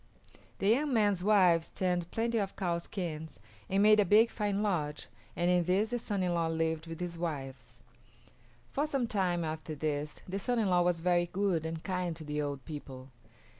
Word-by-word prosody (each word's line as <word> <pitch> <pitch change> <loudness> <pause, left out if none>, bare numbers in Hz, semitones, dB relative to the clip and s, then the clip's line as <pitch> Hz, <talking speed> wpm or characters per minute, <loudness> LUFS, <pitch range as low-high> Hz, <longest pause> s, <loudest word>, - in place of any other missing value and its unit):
The 195 - -1
young 275 +7 +3
man's 205 -4 +2
wives 185 -5 +4
tanned 180 -2 -1
plenty 230 +2 0
of 195 -2 -3
cow 175 -3 -1
skins 160 -4 -6 0.3
and 195 +1 +3
made 215 0 +6
a - - +6
big 215 +5 +5
fine 205 -1 -1
lodge, 150 -8 -1 0.3
and 175 +1 +2
in 180 -1 +3
this 200 +6 +1
the 245 - 0
son 205 -4 -2
in 180 -1 0
law 170 -1 +1
lived 160 0 -1
with 165 -1 -7
his 175 -2 -4
wives. 140 -6 -6 0.9
For 290 +2 0
some 275 -5 0
time 185 -6 0
after 155 0 -4
this 150 0 -3
the 190 +2 -3
son 245 +4 -1
in 210 -5 +1
law 180 0 +4
was 175 -1 +1
very 175 0 +2
good 180 -4 0
and 160 0 -5
kind 180 -3 -2
to 160 - -8
the 150 0 -2
old 140 -3 -4
people. 135 -4 -8
175 Hz, 195 wpm, -31 LUFS, 160-205 Hz, 0.9 s, made